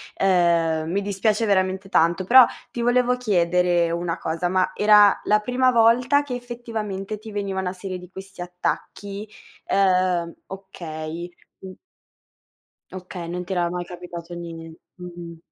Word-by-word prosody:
ehm, 170 -4 +2
mi 200 +2 0
dispiace 205 +3 0
veramente 190 -1 0
tanto. 170 0 +2
Però 250 +6 +8 0.3
ti 240 - -4
volevo 250 +1 +2
chiedere 180 -6 +2
una 170 0 -2
cosa: 165 +2 -2
ma 185 +1 +1
era 210 -1 +6
la 210 0 +3
prima 250 +4 +1
volta 240 +4 +4
che 280 -4 -5
effettivamente 220 -5 -5
ti 215 +1 -11
veniva 200 -2 -3
una 180 -1 -3
serie 185 0 -6
di 180 -1 -12
questi 190 -1 -10
attacchi? 195 +3 -4 0.4
Ehm 185 -3 +1
okay, 170 -3 -7 0.3
mhmm 190 -1 -9 1.2
Okay, 180 -2 -8
non 180 +1 -4
ti 190 - -4
era 175 -2 0
mai 180 0 -4
capitato 175 -1 -9
nie 165 -1 -8 0.2
mh-mh. 175 -2 -9
185 Hz, 140 wpm, -23 LUFS, 175-210 Hz, 1.2 s, Però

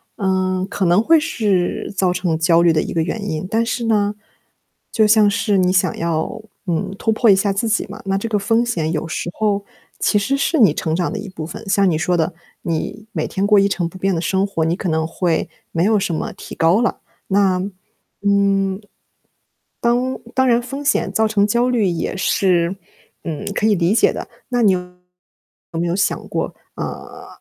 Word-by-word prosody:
嗯， 185 -1 0
可 195 - -1
能 175 +5 +4
会 325 +5 +5
是 210 - -1
造 185 -2 +2
成 180 -3 -1
焦 165 0 +4
虑 170 -1 +5
的 155 -1 +2
一 - - -5
个 165 - +1
原 205 +5 -3
因， 155 +2 -3
但 225 +2 +1
是 235 +1 -2
呢， 210 -2 +1 0.8
就 220 - +4
像 210 -1 +5
是 205 -1 +1
你 180 -1 +3
想 185 -2 +1
要， 165 +6 -2 0.3
嗯， 185 +3 -1
突 225 - +1
破 225 +1 +3
一 195 - +7
下 195 +1 +1
自 210 +4 -1
己 225 - +1
嘛， 210 +3 -9
那 195 0 0
这 200 - -3
个 220 -2 0
风 225 +4 +1
险 165 -10 -1
有 160 0 -2
时 170 - -3
候 205 -2 0 0.3
其 210 - +2
实 270 +7 0
是 310 +3 +1
你 200 - +6
成 160 0 -2
长 175 0 -1
的 - - -3
一 205 -1 -6
部 165 -4 -6
分。 170 - -9
像 195 -1 +3
你 160 - +1
说 175 +2 +1
的， 165 +2 0 0.3
你 205 +6 -3
每 - - -1
天 195 +1 -1
过 210 0 +5
一 200 0 +3
成 175 -3 -1
不 170 - -10
变 195 +1 0
的 165 - -1
生 190 +3 +1
活， 165 -5 -1
你 165 +1 +1
可 180 - -3
能 160 0 0
会 165 0 -1 0.2
没 165 +2 +1
有 215 +1 +3
什 195 -3 -1
么 155 - -3
提 - - -10
高 170 +7 +3
了。 240 - 0 0.3
那， 195 -2 +3 0.7
嗯， 200 -1 +2 1.0
当 245 +2 +1 0.2
当 260 0 +2
然 240 -1 +3
风 275 +4 -6
险 - - +1
造 220 0 +2
成 210 -2 +2
焦 235 +4 +1
虑 240 -4 +2
也 170 0 -2
是， 185 -1 +1 0.5
嗯， 160 -4 -4
可 210 - 0
以 215 - +4
理 175 +1 +2
解 230 - +4
的， - - -6 0.2
那 245 -1 +1
你 210 -4 +5
有 185 - 0 1.0
没 170 - 0
有 170 - 0
想 200 - 0 0.8
过， - - -4
呃， - - -9
195 Hz, 225 characters per minute, -19 LUFS, 175-215 Hz, 1.0 s, 一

